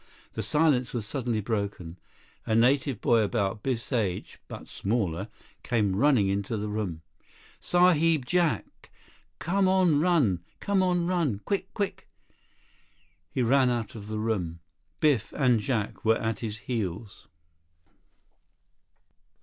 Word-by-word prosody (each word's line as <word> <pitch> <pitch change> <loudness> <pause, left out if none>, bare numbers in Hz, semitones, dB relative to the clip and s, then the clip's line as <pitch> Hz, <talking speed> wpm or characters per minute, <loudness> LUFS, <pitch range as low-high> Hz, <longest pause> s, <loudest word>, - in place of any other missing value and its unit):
The 110 - -3
silence 130 +2 +1
was 115 -3 -2
suddenly 120 -2 -2
broken. 100 -5 -4 0.5
A 110 - +1
native 130 +1 +2
boy 115 -1 +4
about 105 -1 -1
Biff's 125 +1 -3
age, 100 -7 -2
but - - -9
smaller, 100 -3 -2 0.3
came 105 -6 0
running 130 -4 +3
into 100 +3 -1
the 105 0 -3
room. 100 -7 -3 0.6
"Sahib 165 -5 +3
Jack! 175 +2 -1 0.5
Come 190 +3 +1
on 185 -5 +3
run! 150 - +3 0.2
Come 200 -1 +1
on 180 -2 +1
run! 170 - 0
Quick! 195 -2 -2
Quick!" 200 -2 -3 1.2
He 130 - -1
ran 130 +2 +4
out 120 -3 -2
of 105 -2 -9
the 110 0 -4
room. 95 -7 -2 0.4
Biff 145 -8 +2
and 125 -5 +3
Jack 110 -3 -2
were 110 0 +4
at 110 -1 -2
his 110 -2 -4
heels. 105 -5 -4
115 Hz, 125 wpm, -27 LUFS, 105-150 Hz, 1.2 s, boy